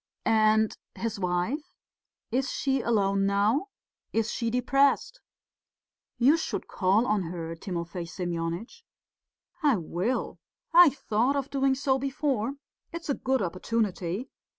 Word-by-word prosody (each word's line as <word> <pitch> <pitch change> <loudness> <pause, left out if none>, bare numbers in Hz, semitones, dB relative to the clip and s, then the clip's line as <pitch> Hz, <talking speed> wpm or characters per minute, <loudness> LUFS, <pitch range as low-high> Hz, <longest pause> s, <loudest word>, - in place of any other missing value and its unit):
"And 220 -1 +3 0.2
his 225 -2 -3
wife... 180 - -1 0.7
is 260 +2 0
she 270 -1 0
alone 200 -4 +2
now? 210 - +2 0.4
Is 225 -1 0
she 230 - -1
depressed?" 275 - +2 1.0
"You 265 +7 +5
should 320 - -3
call 200 +4 +2
on 210 -4 +1
her, 165 -1 -5
Timofey 170 -1 -5
Semyonitch." 175 - -4 0.8
"I 290 -5 +4
will. 180 +8 -2 0.3
I 345 -1 +9
thought 250 -1 0
of 280 0 -2
doing 270 -1 +2
so 265 -1 +1
before; 275 -3 -1 0.4
it's 335 -2 -7
a - - +2
good 260 -3 0
opportunity.... 190 +2 -2
225 Hz, 120 wpm, -28 LUFS, 190-270 Hz, 1.0 s, I